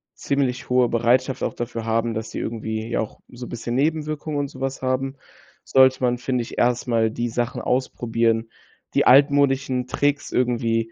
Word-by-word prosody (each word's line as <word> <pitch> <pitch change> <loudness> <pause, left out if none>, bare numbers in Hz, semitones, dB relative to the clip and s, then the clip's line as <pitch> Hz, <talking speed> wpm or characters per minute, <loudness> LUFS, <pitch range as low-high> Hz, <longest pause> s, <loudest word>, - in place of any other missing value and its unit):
ziemlich 130 -3 -1
hohe 125 -1 +4
Bereitschaft 125 +3 +1
auch - - -1
dafür 115 -1 -4
haben, 115 +1 0
dass 110 0 -4
die - - -7
irgendwie, 110 -1 -4
ja, - - -1
auch 110 - -7
so 120 0 -9
'n - - -11
bisschen 120 0 -4
Nebenwirkungen 155 +1 -1
und 140 - -1
sowas 135 -1 -5
haben, 130 +1 -1 0.5
sollte 130 -1 +4
man, 125 -1 +2
finde 125 0 -1
ich, - - -10
erst 125 +1 +1
mal 115 -2 +2
die 120 +1 -2
Sachen 120 +2 -2
ausprobieren, 115 -3 0 0.4
die - - +3
altmodischen 135 -2 +4
Tricks 145 +2 0
irgendwie, 115 -2 0
125 Hz, 170 wpm, -23 LUFS, 115-135 Hz, 0.5 s, hohe